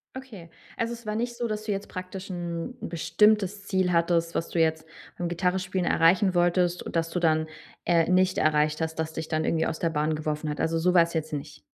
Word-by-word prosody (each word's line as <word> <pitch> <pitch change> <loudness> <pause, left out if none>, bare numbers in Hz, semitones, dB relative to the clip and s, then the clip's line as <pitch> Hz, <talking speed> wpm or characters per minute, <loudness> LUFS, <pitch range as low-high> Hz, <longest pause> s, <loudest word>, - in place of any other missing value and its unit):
Okay. 220 -11 -9 0.3
Also, 230 +1 -1
es 235 -1 -11
war 210 - -2
nicht 240 +1 -2
so, 240 0 -2
dass 215 -1 -3
du 215 - -3
jetzt 195 0 -3
praktisch 185 +1 -7
'n 175 +5 -4
n' - - -5
bestimmtes 200 +3 +2
Ziel 185 -2 +1
hattest, 170 0 +1
was 165 - -1
du 170 - -1
jetzt 160 0 +1 0.3
beim 175 - -2
Gitarre 180 +2 0
spielen 185 -1 -2
erreichen 180 +3 +3
wolltest 175 0 +2
und - - -7
dass 165 0 +1
du 180 - -2
dann, 160 -2 +2 0.4
äh, 170 -2 +3
nicht 185 0 +3
erreicht 150 0 +2
hast, 160 0 -3
dass 160 0 -2
dich 160 0 -5
dann 155 -1 -1
irgendwie 160 0 +1
aus 160 - -3
der 165 - +1
Bahn 155 0 0
geworfen 155 0 -3
hat? 150 - -4
Also, 165 0 +1
so 180 +2 +2
war's 170 -1 +4
jetzt 155 -1 -2
nicht? 145 +1 -6
170 Hz, 230 wpm, -26 LUFS, 160-190 Hz, 0.4 s, war's